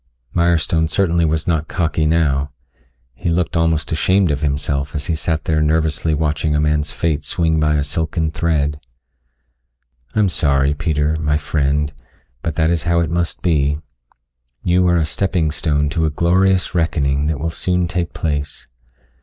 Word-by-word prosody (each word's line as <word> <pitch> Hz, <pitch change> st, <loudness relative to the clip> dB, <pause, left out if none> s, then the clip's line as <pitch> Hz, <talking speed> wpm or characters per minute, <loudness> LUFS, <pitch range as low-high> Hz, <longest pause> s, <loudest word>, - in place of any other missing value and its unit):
Mirestone 85 Hz, -2 st, +2 dB
certainly 85 Hz, -1 st, +2 dB
was 80 Hz, 0 st, 0 dB
not 80 Hz, -2 st, 0 dB
cocky 80 Hz, -3 st, 0 dB
now. 75 Hz, -3 st, +1 dB, 0.6 s
He 75 Hz, -, -3 dB
looked 85 Hz, 0 st, 0 dB
almost 80 Hz, -1 st, +1 dB
ashamed 95 Hz, +3 st, +2 dB
of 70 Hz, -1 st, -2 dB
himself 70 Hz, -1 st, -1 dB
as 70 Hz, -1 st, -2 dB
he 85 Hz, -, -1 dB
sat 80 Hz, -1 st, -1 dB
there 75 Hz, -1 st, +1 dB
nervously 80 Hz, 0 st, +1 dB
watching 75 Hz, 0 st, 0 dB
a -, -, +2 dB
man's 75 Hz, 0 st, +1 dB
fate 75 Hz, -1 st, -1 dB
swing 80 Hz, +1 st, 0 dB
by 75 Hz, 0 st, +2 dB
a 75 Hz, -, +1 dB
silken 80 Hz, +1 st, -1 dB
thread. 75 Hz, -3 st, 0 dB, 1.4 s
"I'm 105 Hz, -2 st, +3 dB
sorry, 70 Hz, -4 st, +2 dB
Peter, 75 Hz, 0 st, 0 dB
my 75 Hz, -1 st, +1 dB
friend, 75 Hz, 0 st, 0 dB, 0.5 s
but 80 Hz, +1 st, -3 dB
that 80 Hz, 0 st, +2 dB
is 85 Hz, -3 st, -1 dB
how 85 Hz, 0 st, +2 dB
it 80 Hz, -, -1 dB
must 85 Hz, 0 st, -2 dB
be. 75 Hz, -4 st, +2 dB, 0.9 s
You 90 Hz, +1 st, +3 dB
are 85 Hz, 0 st, +3 dB
a 80 Hz, -, +2 dB
stepping 80 Hz, 0 st, 0 dB
stone 75 Hz, -1 st, 0 dB
to 80 Hz, -1 st, 0 dB
a -, -, +2 dB
glorious 90 Hz, +5 st, +2 dB
reckoning 75 Hz, -4 st, 0 dB
that 75 Hz, -3 st, -1 dB
will 80 Hz, +2 st, -2 dB
soon 90 Hz, +1 st, 0 dB
take 90 Hz, -1 st, -2 dB
place. 75 Hz, -2 st, -3 dB
80 Hz, 160 wpm, -19 LUFS, 75-85 Hz, 1.4 s, I'm